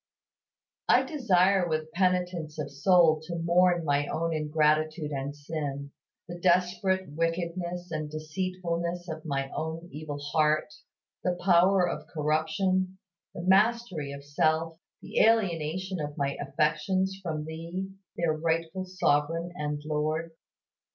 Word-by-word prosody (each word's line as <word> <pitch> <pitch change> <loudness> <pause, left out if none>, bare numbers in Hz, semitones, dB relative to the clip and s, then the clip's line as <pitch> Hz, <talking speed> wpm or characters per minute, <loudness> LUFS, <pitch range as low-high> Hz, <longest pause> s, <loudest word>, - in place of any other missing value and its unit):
I - - +6
desire 195 - +2
with 155 0 -2
penitence 180 -3 0
of 145 -2 -4
soul 155 +1 +4
to 170 - -4
mourn 175 0 +3
my 145 0 +1
own 165 0 -1
ingratitude 155 0 +1
and 140 +1 -3
sin, 145 -2 -5 0.4
the 175 0 -7
desperate 185 +1 +2
wickedness 170 +2 -2
and 155 -1 -3
deceitfulness 170 +2 -3
of 160 -2 -6
my 135 -2 -2
own 160 +2 -4
evil 150 -1 -6
heart, 150 +1 +1 0.5
the 180 -1 0
power 180 0 +5
of - - -4
corruption, 165 +5 0 0.4
the 170 - -5
mastery 190 -5 +2
of 140 0 -9
self, 160 +3 0 0.2
the - - -2
alienation 185 -4 +2
of 145 0 -4
my 140 -1 0
affections 165 +7 0
from 155 -4 -3
Thee 165 +4 -5 0.3
their 170 -2 +1
rightful 165 +3 -1
Sovereign 165 -1 0
and 150 -2 -3
Lord. 155 +2 -1
165 Hz, 125 wpm, -28 LUFS, 150-180 Hz, 0.5 s, I